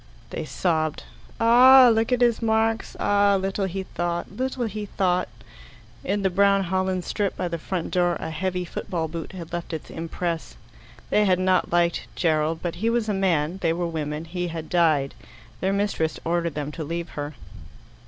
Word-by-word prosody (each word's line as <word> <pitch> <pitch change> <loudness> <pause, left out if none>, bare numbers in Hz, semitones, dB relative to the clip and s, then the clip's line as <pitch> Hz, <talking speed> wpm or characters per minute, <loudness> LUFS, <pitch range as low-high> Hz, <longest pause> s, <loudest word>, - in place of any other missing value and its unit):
They - - -4
sobbed. 160 -4 -1 0.4
"Ah, 250 +2 +8
look 225 +2 0
at 250 -1 +2
his 240 -1 +3
marks! 225 0 +1
Ah, 200 -1 +3
little 195 +1 -1
he 190 +1 -3
thought 175 +1 -3
little 255 0 -2
he 210 -1 -5
thought!" 180 -2 0 0.8
In 200 +2 -1
the 190 - +2
brown 200 +1 +4
holland 185 0 -1
strip 205 -2 -2
by 180 - -1
the 170 -1 -4
front 175 +1 -4
door 175 -1 +2
a 160 - -5
heavy 180 +2 -2
football 165 -1 -3
boot 165 +2 -7
had 170 -3 -9
left 170 0 -4
its 160 - -6
impress. 165 0 -4 0.6
They 210 - +4
had 185 -2 +3
not 185 0 +1
liked 175 0 +1
Gerald, 160 -1 +1
but 175 -1 -3
he 225 - +2
was 230 -2 0
a - - +1
man, 180 -3 0
they 165 -2 +2
were 175 +1 -2
women, 155 -1 -3
he 175 +1 -3
had 165 -2 -6
died. 155 -6 +2 0.5
Their 190 - 0
mistress 200 -6 -1
ordered 170 -2 0
them 150 0 -3
to 160 - -5
leave 170 +2 -4
her. 145 0 -6
180 Hz, 180 wpm, -24 LUFS, 165-200 Hz, 0.8 s, Ah